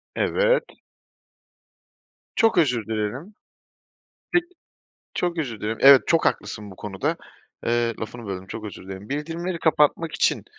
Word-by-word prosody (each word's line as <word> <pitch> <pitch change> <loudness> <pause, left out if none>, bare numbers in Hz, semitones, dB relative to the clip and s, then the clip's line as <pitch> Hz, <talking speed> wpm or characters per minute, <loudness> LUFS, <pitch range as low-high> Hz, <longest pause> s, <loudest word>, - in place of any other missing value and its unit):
Evet. - - +2 1.7
Çok 225 -4 +3
özür 125 -9 +2
dilerim. 110 - -4 1.0
Peki. 350 0 +3 0.7
Çok 175 -1 -1
özür 125 -9 -3
dilerim. 110 +1 -2
Evet, 135 -1 +9
çok 165 - +3
haklısın 105 -2 -2
bu 95 - -12
konuda. 95 -2 -2 0.5
Eee, 120 0 +1
lafını 115 +1 -6
böldüm, 95 -1 -5
çok 110 +3 -7
özür 105 -3 -8
dilerim. 95 +2 -8
Bildirimleri 165 +5 -3
kapatmak 160 0 +2
için, - - +1
125 Hz, 125 wpm, -24 LUFS, 105-165 Hz, 1.7 s, Evet